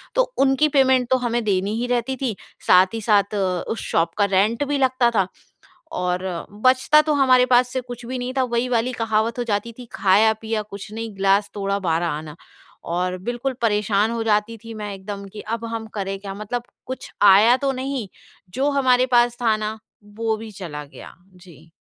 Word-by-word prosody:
तो - - +5 0.2
उनकी 270 +2 +3
पेमेंट 260 -3 +3
तो 260 - +4
हमें 240 -2 -1
देनी 200 0 0
ही 245 - -2
रहती 245 +2 -1
थी। 240 -6 -1 0.3
साथ 185 +2 +5
ही 225 - -3
साथ 205 -1 +2 0.3
उस 225 - -2
शॉप 165 0 +1
का 205 - +4
रेंट 200 +6 +1
भी 285 0 0
लगता 255 -2 +2
था 190 -2 +2 0.7
और 180 0 -1 0.4
बचता 260 +4 +5
तो 305 0 0
हमारे 260 -3 +5
पास 250 0 +4
से 260 - -1
कुछ 245 -1 -9
भी 255 +2 -4
नहीं 250 +1 -4
था। 260 - +3
वही 240 0 -1
वाली 240 +1 +1
कहावत 225 +1 0
हो 245 - 0
जाती 225 +1 -2
थी, 250 - -8
खाया-पिया 220 +3 +2
कुछ 205 0 -10
नहीं 225 -1 -6
ग्लास 195 +1 +2
तोड़ा 200 0 -1
12 170 -2 0
आना 150 -1 -5 0.5
और 180 +2 -2
बिल्कुल 245 +2 -2
परेशान 210 0 +1
हो 230 -1 -2
जाती 215 +1 0
थी 225 - -7
मैं 210 -2 -6
एकदम 200 +1 -7
कि 210 - -7
अब 230 +1 -4
हम 225 -1 -4
करें 195 -1 -3
क्या? 195 -1 -7
मतलब 215 +4 -4 0.2
कुछ 260 - -7
आया 205 +5 +7
तो 275 +1 0
नहीं 260 -3 -4 0.5
जो 270 +5 +1
हमारे 255 -1 +4
पास 240 0 +3
था 220 -2 +3
ना 215 +1 -4 0.4
वो 225 -1 0
भी 220 0 -9
चला 165 -7 -7
गया। 140 - -13 0.2
जी। 170 -3 -17
225 Hz, 190 wpm, -22 LUFS, 200-245 Hz, 0.7 s, आया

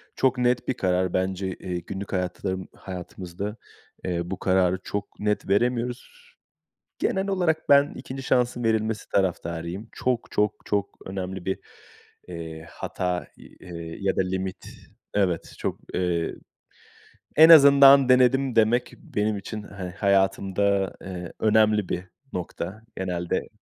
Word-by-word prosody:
Çok 130 -1 +2
net 125 0 +1
bir 130 - +1
karar 90 -2 0
bence, 95 +1 -1
eee, 90 -1 -5
günlük 95 +4 -7
hayatlarım 95 0 -2
hayatımızda, 95 +2 -6 0.5
ııı, 85 0 -2
bu 95 - -4
kararı 95 -1 +2
çok 100 0 -5
net 105 -2 -1
veremiyoruz. 120 +3 0 0.9
Genel 190 +1 0
olarak 175 -5 0
ben 140 0 +6
2'nci 135 +1 -7
şansın 120 -1 +1
verilmesi 110 -1 0
taraftarıyım. 85 +1 -2
Çok, 125 -2 -1
çok, 105 0 +1
çok 100 -1 -2
önemli 95 -1 -5
bir, 95 - -1 0.7
ııı, 80 -2 -7
hata, 90 -1 -3 0.4
ııı, 90 -2 -8 0.2
ya 100 -1 0
da - - +3
limit 95 0 -4 0.5
evet, 90 -5 0
çok, - - -3 0.2
ııı, 85 -2 0 1.0
en 160 +2 +9
azından 140 -3 +9
denedim 130 +1 +4
demek, 115 +3 +3
benim 105 0 -2
için, 105 +2 -6
hani, 95 -3 -7
hayatımda, 95 0 +1
ııı, 90 -2 -7
önemli 110 -2 +3
bir 90 +1 -3 0.3
nokta 90 +3 -5
genelde 90 -2 -2
100 Hz, 125 wpm, -25 LUFS, 90-120 Hz, 1.0 s, en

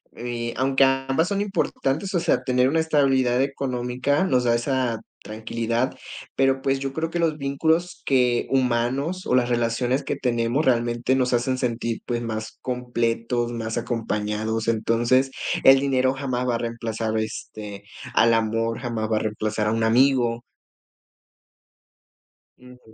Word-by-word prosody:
eh, 120 -1 -4
aunque 135 +1 +3
ambas 135 +5 +2
son 200 -1 0
importantes, 195 -3 -1
o 175 - +2
sea, - - +1
tener 125 0 +2
una 160 +3 +1
estabilidad 135 -5 +2
económica 135 +1 -1
nos 130 -9 +2
da 120 -1 +3
esa 120 -2 0 0.2
tranquilidad, 115 +3 -2 0.4
pero, 135 0 +2
pues, 135 -1 0
yo 135 0 -4
creo 160 +2 -2
que 170 - -3
los 160 -2 +1
vínculos 160 +6 0
que 125 -3 +2
humanos 130 +7 0
o - - 0
las 125 -1 +2
relaciones 120 +3 0
que - - -2
tenemos 120 +3 0
realmente 120 0 +1
nos 130 -1 +1
hacen 125 +2 +1
sentir, 115 -2 -2
pues, 120 -1 -2
más 110 -2 -5
completos, 120 -1 -1
más 115 -1 -4
acompañados. 110 -1 -2
Entonces, 120 +4 +2 0.3
el 135 0 +8
dinero 130 -1 +1
jamás 130 -2 -2
va 120 - +1
a - - +1
reemplazar, 115 -1 -3
este, 105 -2 -6 0.3
al 115 +1 +4
amor, 115 +1 0
jamás 115 -3 -3
va 110 - +2
a - - +2
reemplazar 105 0 -2
a - - +1
un 115 0 0
amigo. 120 0 +3 2.1
Ujú. 125 -3 -17
125 Hz, 145 wpm, -24 LUFS, 115-135 Hz, 2.1 s, el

